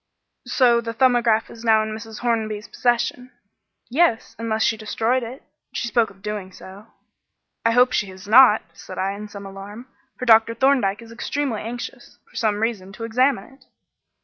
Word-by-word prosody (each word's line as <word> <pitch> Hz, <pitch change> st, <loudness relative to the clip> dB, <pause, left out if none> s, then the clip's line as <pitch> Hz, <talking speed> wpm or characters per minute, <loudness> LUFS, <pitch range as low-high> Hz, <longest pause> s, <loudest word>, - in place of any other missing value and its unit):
"So 240 Hz, -3 st, +3 dB
the 230 Hz, -1 st, -5 dB
'Thumbograph' 240 Hz, -3 st, +3 dB
is 230 Hz, -, -12 dB
now 220 Hz, -1 st, +4 dB
in 215 Hz, 0 st, -4 dB
Mrs. 220 Hz, 0 st, -8 dB
Hornby's 220 Hz, -3 st, -1 dB
possession?" 245 Hz, +1 st, -1 dB, 0.6 s
"Yes, 255 Hz, -3 st, +1 dB
unless 220 Hz, -1 st, -1 dB
she 225 Hz, -, +2 dB
has -, -, -17 dB
destroyed 225 Hz, +4 st, 0 dB
it. 240 Hz, +3 st, -8 dB, 0.3 s
She 235 Hz, -, -2 dB
spoke 230 Hz, -1 st, +2 dB
of 195 Hz, 0 st, -20 dB
doing 210 Hz, -3 st, -5 dB
so." 195 Hz, +3 st, -13 dB, 0.8 s
"I 230 Hz, -, +3 dB
hope 250 Hz, +1 st, +5 dB
she 210 Hz, -, 0 dB
has 190 Hz, +1 st, -12 dB
not," 225 Hz, 0 st, +7 dB
said 185 Hz, -, -11 dB
I, 190 Hz, +1 st, 0 dB
in 205 Hz, +1 st, -7 dB
some 200 Hz, -1 st, -10 dB
alarm, 195 Hz, +4 st, -9 dB, 0.3 s
"for 250 Hz, -, -4 dB
Dr. 225 Hz, -1 st, +5 dB
Thorndyke 240 Hz, -6 st, +2 dB
is 230 Hz, -, -14 dB
extremely 250 Hz, 0 st, -3 dB
anxious, 240 Hz, +2 st, -7 dB
for -, -, -24 dB
some 215 Hz, -3 st, 0 dB
reason, 210 Hz, -4 st, -2 dB
to 225 Hz, -, -8 dB
examine 250 Hz, +4 st, +1 dB
it." 270 Hz, -, -23 dB
225 Hz, 175 wpm, -22 LUFS, 210-240 Hz, 0.8 s, not